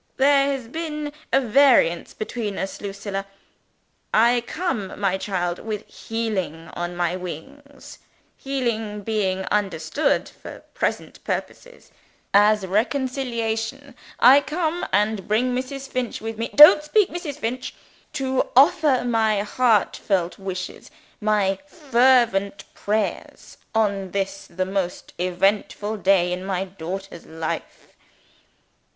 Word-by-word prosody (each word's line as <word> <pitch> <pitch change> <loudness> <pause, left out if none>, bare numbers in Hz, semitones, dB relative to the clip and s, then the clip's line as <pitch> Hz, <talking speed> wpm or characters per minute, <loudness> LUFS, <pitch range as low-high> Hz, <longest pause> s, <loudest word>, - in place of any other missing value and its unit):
There 275 0 +4
has 270 -4 -3
been 300 +1 -5 0.2
variance 255 -8 +3
between 215 -2 -4
us, 190 - -5
Lucilla. 195 0 -5 0.8
I 235 +2 +4
come, 270 - -3
my 190 -2 0
child, 180 -3 -2
with 215 -2 -5
healing 195 -8 -4
on 175 0 -4
my 175 0 0
wings 270 - -9 0.4
(healing 225 -6 -3
being 195 -3 -1
understood, 200 - 0
for - - -11
present - - -3
purposes, - - -6 0.4
as 205 0 +5
reconciliation) 245 +3 -2 0.3
I 265 +4 +8
come, 315 +4 -2
and 210 0 +1
bring 245 +4 +1
Mrs. 270 +2 -4
Finch 255 -3 -3
with 225 0 -5
me 230 - -2
don't 300 0 +10
speak, 375 +6 +2
Mrs. 335 -5 -5
Finch! 250 -1 -4 0.4
to 265 -1 -1
offer 290 -2 +5
my 220 -3 +2
heartfelt 205 -6 +1
wishes, 185 -1 -6 0.3
my 205 -3 +1
fervent 245 - +2
prayers, 215 +1 -3 0.2
on 200 -3 +1
this 195 +1 -3
the 185 +2 -3
most 190 -2 -3
eventful 200 +4 0
day 190 -3 +3
in 180 +1 -5
my 190 -1 -2
daughter's 185 -1 -7
life. 160 0 -6
215 Hz, 110 wpm, -23 LUFS, 195-265 Hz, 0.8 s, don't